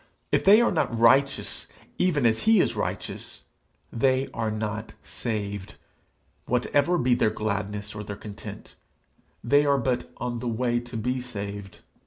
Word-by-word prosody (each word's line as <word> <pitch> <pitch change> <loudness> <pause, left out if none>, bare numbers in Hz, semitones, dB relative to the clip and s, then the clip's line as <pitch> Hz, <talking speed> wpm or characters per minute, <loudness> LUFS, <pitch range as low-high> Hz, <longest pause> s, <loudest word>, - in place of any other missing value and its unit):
If - - +2
they 210 +4 +7
are 240 - +3
not 155 -9 0
righteous 135 +4 +3 0.3
even 160 -8 +2
as 110 -1 +3
he 220 -2 +4
is - - +2
righteous, - - -5 0.5
they 130 +3 +2
are 115 -1 -1
not 110 0 -4
saved, 100 -4 -4 0.7
whatever 145 +7 +2
be 125 -5 +2
their 115 - +3
gladness 105 -1 -3
or 105 0 -6
their 100 0 -6
content; 105 0 -9 0.7
they 145 +5 +4
are 140 -1 +3
but 125 -1 -1
on 120 -1 -3
the 125 - -4
way 120 +1 0
to 120 -1 -7
be 125 +3 -1
saved. 100 -5 -6
120 Hz, 150 wpm, -26 LUFS, 105-135 Hz, 0.7 s, they